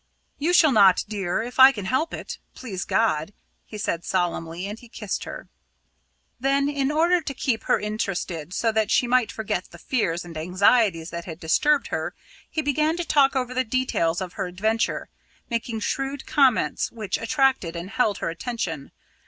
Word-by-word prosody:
"You 315 +5 +1
shall 325 -4 +6
not, 200 -6 +6
dear 200 -1 -2
if 245 +2 -7
I 260 +1 +10
can 205 -7 -6
help 265 - 0
it - - -6 0.2
please 195 -8 -5
God," 155 +5 +1 0.3
he 215 - -8
said 175 -5 -2
solemnly, 175 -1 -2
and 210 +3 -6
he 240 - -15
kissed 210 -3 -4
her. - - -8 0.9
Then, 275 +2 +2
in 285 -1 0
order 340 +3 +3
to 295 -3 -5
keep 245 -3 -1
her - - +3
interested 185 -6 -3
so 225 +4 +1
that 220 -1 +1
she - - +3
might 240 -2 +2
forget 215 -5 -3
the - - -13
fears 175 -9 -1
and 170 -2 -10
anxieties 180 +1 +2
that 170 0 -5
had 165 -2 -8
disturbed 290 - +2
her, - - -3 0.3
he 315 - -2
began 305 +3 +1
to 345 - -2
talk 275 -3 +3
over 255 -1 -1
the 255 0 +1
details 220 -9 0
of 180 -2 -5
her 195 -2 -3
adventure, 220 +5 -1 0.4
making 230 -1 -2
shrewd 270 +4 -2
comments 270 -5 +2
which 215 -4 -3
attracted 255 - +1
and 170 +4 -6
held 220 -5 +1
her - - -2
attention. 170 - -4
220 Hz, 175 wpm, -24 LUFS, 180-265 Hz, 0.9 s, I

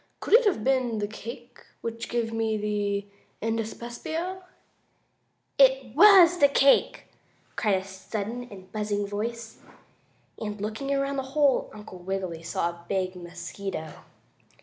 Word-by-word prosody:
Could - - -3
it 475 +1 +7
have 365 - +1
been 255 -3 +1
the 205 -1 -1
cake 235 +3 -10 0.2
which 230 0 -5
gave 230 -1 -1
me 225 -1 0
the 205 -1 -1 0.3
indyspepsia?" 240 - -4 1.2
"It 265 -3 +4
was 355 -1 +8
the 285 - +7
cake!" 275 0 +3 0.5
cried 210 -4 +2
a 190 - -2
sudden 205 +5 -5
and 190 -2 -13
buzzing 210 -1 -1
voice, 225 +3 -5 0.8
and, 210 -1 -5
looking 220 +7 -3
around 275 0 0
the - - 0 0.2
hole 285 -3 +3
Uncle 210 -3 -11
Wiggily 185 -2 -4
saw 170 +1 -1
a 170 0 -16
big 185 -1 -1
mosquito. 175 -1 -6
220 Hz, 130 wpm, -27 LUFS, 200-265 Hz, 1.2 s, was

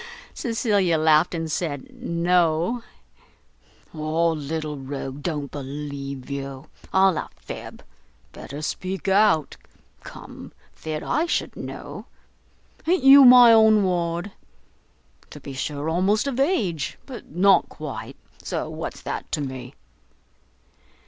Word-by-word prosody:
Cecilia 205 -8 +1
laughed, 155 +2 +3
and 165 -1 -3
said 145 -6 -4
"No." 170 +5 +1 1.1
"Ah, 160 +2 0
little 155 0 -4
rogue, 135 0 -6
don't 145 -3 -3
believe 140 -1 -6
you! 135 -1 -6 0.3
all 190 -2 +4
a - - -6
fib! - - -9 0.5
better 145 +2 -8
speak 185 +5 -4
out: 195 -6 +3 0.5
come, - - -11 0.2
fit 155 -1 -5
I 325 +3 0
should - - -2
know; - - -8 0.8
a'n't 350 -4 +2
you 275 +1 +9
my 245 -2 +9
own 220 -2 +6
ward? 175 +1 -1 1.0
to - - -11
be 140 - -9
sure, 145 +2 -4
almost 190 +7 +1
of 270 -2 -3
age, 270 - 0
but 260 -4 -10
not 185 +2 +3
quite, - - -7 0.3
so - - -4
what's - - -6
that - - -5
to 150 - 0
me?" 130 -1 -6
165 Hz, 115 wpm, -23 LUFS, 145-200 Hz, 1.1 s, you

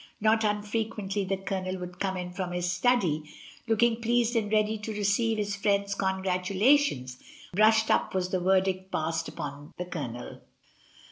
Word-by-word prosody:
Not 220 +1 +3
unfrequently 210 -1 -1
the 195 +1 -1
Co 195 0 -3
lonel 185 0 -4
would 180 0 -8
come 190 -1 -1
in 180 0 -5
from 180 -1 -4
his 180 0 -1
study, 180 -5 +2 0.5
looking 230 +1 +2
pleased 240 +1 +2
and 215 -2 0
ready 215 0 +2
to 210 +1 -5
receive 210 +2 +1
his 205 -1 -1
friends' 200 0 +1
congratulations, 190 - +1 0.3
"brushed 220 +3 +4
up" - - +1
was 185 -1 0
the 185 - 0
verdict 190 +1 +1
passed 160 +1 -1
upon 145 0 -7
the 180 - -3
Co 180 -2 -5
lonel. 120 -3 -6
195 Hz, 160 wpm, -28 LUFS, 180-215 Hz, 0.5 s, brushed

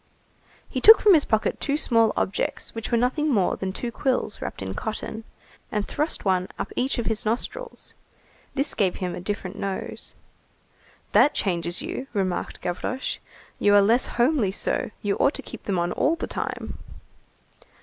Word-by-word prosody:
He - - -3
took 445 +1 +10
from 415 - +6
his 310 -4 +5
pocket 220 -1 0
two 285 +1 0
small 230 -6 +3
objects 190 - -1
which 225 +1 -5
were 235 - +4
nothing 255 +6 +1
more 200 -7 +2
than 190 0 -3
two 235 +5 -4
quills 255 -5 -1
wrapped - - -5
in 95 0 -4
cotton, 220 - -5 0.5
and 210 -1 -1
thrust 300 -5 -2
one 185 -1 +2
up - - -4
each 260 +2 0
of 235 - -1
his 220 0 0
nostrils. 465 - -3 0.6
This 275 +2 0
gave 190 -4 +1
him 180 -2 -3
a 180 - -6
different 200 0 -4
nose. 195 -1 -4 1.0
"That 295 - +5
changes 175 +3 0
you," 320 -4 -5
remarked 190 -4 -2
Gavroche, 220 +9 -3 0.4
"you 205 0 +5
are 205 - +8
less 230 +5 +3
homely 240 -5 +3
so, 225 +4 -1
you 205 -1 0
ought 280 - +3
to - - +1
keep 235 - -10
them 195 -3 0
on 175 0 0
all 320 - +2
the 335 - -4
time." - - -5
220 Hz, 170 wpm, -25 LUFS, 190-265 Hz, 1.0 s, took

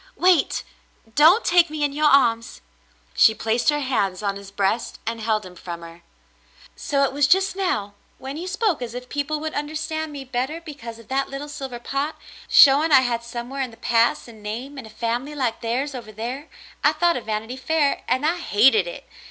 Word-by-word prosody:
Wait! 360 -5 +3 0.5
Don't 325 - +6
take 345 -2 +4
me 305 -1 -3
in 285 -1 0
your 300 +1 +2
arms." 235 -5 +2 0.5
She 220 - +5
placed 225 +5 +1
her 295 0 +1
hands 205 -8 -1
on 200 -1 -1
his 200 0 -10
breast 200 +4 -1
and 230 0 -3
held 215 -2 0
him 180 - -11
from 170 -1 -8
her. 165 +1 -12 0.7
"So 280 -2 0
it 270 - 0
was 285 0 +3
just 380 +3 +3
now 215 - -1
— - - -37
when 270 +1 -7
you 345 +4 -5
spoke 395 - 0
as 240 -1 -5
if 250 0 -7
people 290 +1 -2
would 315 +1 -4
understand 315 +1 -3
me 280 -2 -7
better 260 +5 -3
because 280 -9 -9
of 230 - -15
that 270 +1 -1
little 275 +2 -6
silver 270 -4 -6
pot, 275 +5 -3 0.3
showing 290 +3 +7
I 270 -2 +8
had 235 -2 -1
somewhere 240 +3 -5
in 260 - -2
the 225 - -16
past 230 +1 +1
a 235 - -12
name 225 +6 -7
and 235 - -9
a - - -13
family 235 +6 -3
like 250 -5 -2
theirs 255 +5 -2
over 235 -4 -8
there 245 +8 -6 0.2
— - - -22
I - - +4
thought 345 -1 +2
of 250 - -5
'Vanity 220 +3 -4
Fair,' 285 +2 0
and 260 +4 +1
I 335 +3 +1
hated 270 - +4
it. - - -8
265 Hz, 210 wpm, -23 LUFS, 230-300 Hz, 0.7 s, I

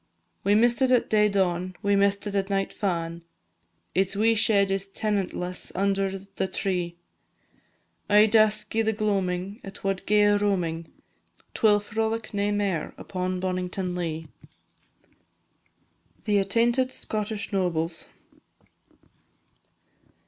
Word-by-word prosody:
We 200 +1 +3
miss'd 240 +4 +3
it 260 - +4
at 250 -2 +2
day 210 -1 +4
dawn, 185 -2 0
we 200 0 +3
miss'd 200 +1 +2
it 205 -1 -4
at 195 0 0
night 195 -1 -1
fa'in', 170 -4 -2 0.7
Its 190 +1 +1
wee 225 +3 +3
shed 210 -3 +3
is 195 0 0
tenantless 195 -3 -2
under 195 0 0
the 195 0 -4
tree, 180 -2 -2 1.1
Ae 210 +1 +7
dusk 215 0 +3
i' 225 - +3
the 220 0 +1
gloamin' 200 -1 -1
it 195 - -10
wad 195 -1 -1
gae 210 0 +4
a 205 0 +4
roamin'; 170 -5 -1 0.6
'T - - -6
will 210 -2 +5
frolic 220 +2 -3
nae 205 0 0
mair 200 -6 -1
upon 185 0 -3
Bonnington 185 0 -2
Lea. 165 -2 -4 2.0
THE 205 -2 +2
ATTAINTED 235 +6 +1
SCOTTISH 215 -2 -3
NOBLES. 170 -3 -1
200 Hz, 125 wpm, -26 LUFS, 185-210 Hz, 2.0 s, Ae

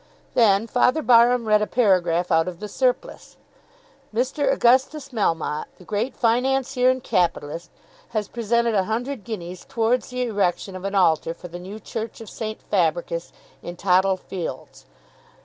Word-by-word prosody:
Then 215 -3 +4
Father 250 +5 +2
Barham 240 -1 +5
read 210 0 +4
a 210 - 0
paragraph 180 -6 +2
out 165 0 +3
of 175 -2 -6
"The 210 - -5
Surplice." 250 +3 -2 0.7
"Mr. 260 +5 0
Augustus 265 +4 +2
Melmotte, 165 - -1
the - - -15
great 215 +7 -2
financier 255 +2 +2
and 255 -1 0
capitalist, 170 -1 -1 0.4
has 215 -3 -2
presented 235 +1 0
a 195 -3 +2
hundred 240 +2 -3
guineas 180 -5 -7
towards 235 0 0
the 250 0 -2
erection 200 -4 -1
of 185 +1 -7
an 200 +1 -2
altar 165 -3 +2
for 180 - -10
the 175 +1 -8
new 195 +4 -8
church 225 0 -6
of 225 - -10
St. 215 -1 -5
Fabricius, 170 -2 -1 0.3
in 175 - -7
Tothill 190 +1 +2
Fields. 185 -2 -7
215 Hz, 150 wpm, -23 LUFS, 180-245 Hz, 0.7 s, Barham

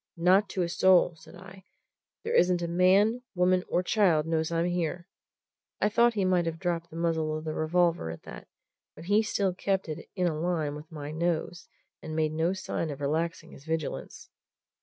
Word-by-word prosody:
"Not 185 +4 +4
to 185 - -1
a - - -1
soul!" 180 0 +4
said 160 - -15
I. 190 +1 -13 0.6
"There 460 - -3
isn't 180 - +3
man, 190 +7 +3
woman, 180 0 +3
or 180 - 0
child 180 -6 +2
knows 160 0 -1
I'm 165 0 +1
here." 175 0 -2 0.7
I 210 - +2
thought 235 +2 +3
he 200 -3 +1
might 180 -2 +2
have 165 0 -3
dropped 170 -1 -2
the 160 - -12
muzzle 160 -2 -1
of 155 - -7
the 155 -1 -3
revolver 170 - +1
at 80 - -8
that, - - -10 0.5
but 160 - -11
he 205 +4 +3
still 200 -3 0
kept 190 +1 -1
it 155 - -7
in 180 -2 0
a 170 - +1
line 160 -4 -1
with 150 +3 -10
my 150 -2 -6
nose 170 +1 -2 0.3
and 155 0 -6
made 155 -1 +1
no 160 +3 +1
sign 190 -3 -3
of 140 - -6
relaxing 160 +4 -2
his 135 - -14
vigilance. 160 -2 -5
170 Hz, 190 wpm, -28 LUFS, 160-185 Hz, 0.7 s, Not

